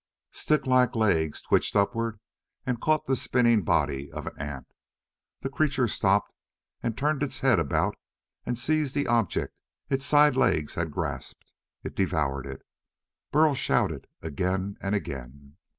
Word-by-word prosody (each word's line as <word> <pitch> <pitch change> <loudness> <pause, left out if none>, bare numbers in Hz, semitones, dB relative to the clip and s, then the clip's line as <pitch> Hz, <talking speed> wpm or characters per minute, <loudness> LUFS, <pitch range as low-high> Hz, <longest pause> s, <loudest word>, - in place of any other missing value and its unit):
Sticklike 130 -5 +2
legs 80 -9 +1
twitched - - +1
upward 115 +2 +1 0.5
and 125 -2 -2
caught 155 -1 +2
the 135 - +1
spinning 120 -3 +3
body 70 -4 0
of - - -6
an - - -5
ant. 70 -2 -6 0.7
The 135 - -3
creature 135 -3 +1
stopped, 100 -1 +1 0.5
and 115 -1 -2
turned 150 +1 0
its 145 - -2
head 130 -8 +4
about 80 -4 0 0.5
and 125 - -2
seized 150 +2 0
the 145 - +1
object 115 -5 0 0.4
its 135 0 +1
side 145 0 +5
legs 80 - +2
had 85 -1 -2
grasped. 75 - -5 0.3
It - - -6
devoured 70 -8 0
it. 70 0 -8 0.7
Burl 155 0 +4
shouted 105 - 0 0.2
again 95 +6 -2
and 100 +1 0
again. 70 -3 -7
110 Hz, 140 wpm, -27 LUFS, 80-135 Hz, 0.7 s, side